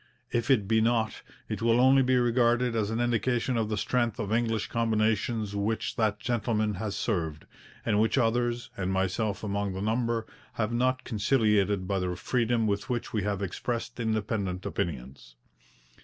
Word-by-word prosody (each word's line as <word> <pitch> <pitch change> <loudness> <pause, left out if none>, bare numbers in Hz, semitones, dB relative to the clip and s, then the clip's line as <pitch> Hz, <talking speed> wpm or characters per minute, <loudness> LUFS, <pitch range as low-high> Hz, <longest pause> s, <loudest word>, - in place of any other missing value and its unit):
If 120 +2 -1
it 110 -8 +3
be 110 +1 +3
not, 115 -1 +1 0.3
it 105 0 -4
will 115 +1 +3
only 135 +2 +6
be 130 0 +2
regarded 120 0 +2
as 105 -2 0
an 115 +1 -2
indication 120 +1 +1
of 110 -2 0
the 105 - -1
strength 120 0 0
of 105 +1 -2
English 115 -2 +1
combinations 110 -1 0
which 105 +2 -1
that 105 -2 +1
gentleman 110 -2 0
has 100 +1 -4
served, 80 -9 -2 0.4
and 105 -2 +2
which 110 +5 +2
others, 120 0 0
and 95 -1 -2
myself 95 +3 -1
among 100 -1 -1
the 95 - -5
number, 115 +1 0 0.3
have 110 +1 -1
not 130 +2 +1
conciliated 105 -4 +1
by 100 0 0
the 90 -1 -2
freedom 115 +2 0
with 105 +5 -1
which 120 -2 -3
we 110 - +1
have 100 0 -2
expressed 115 +5 -4
independent 105 -4 -2
opinions. 65 -5 -5
110 Hz, 165 wpm, -28 LUFS, 100-120 Hz, 0.4 s, only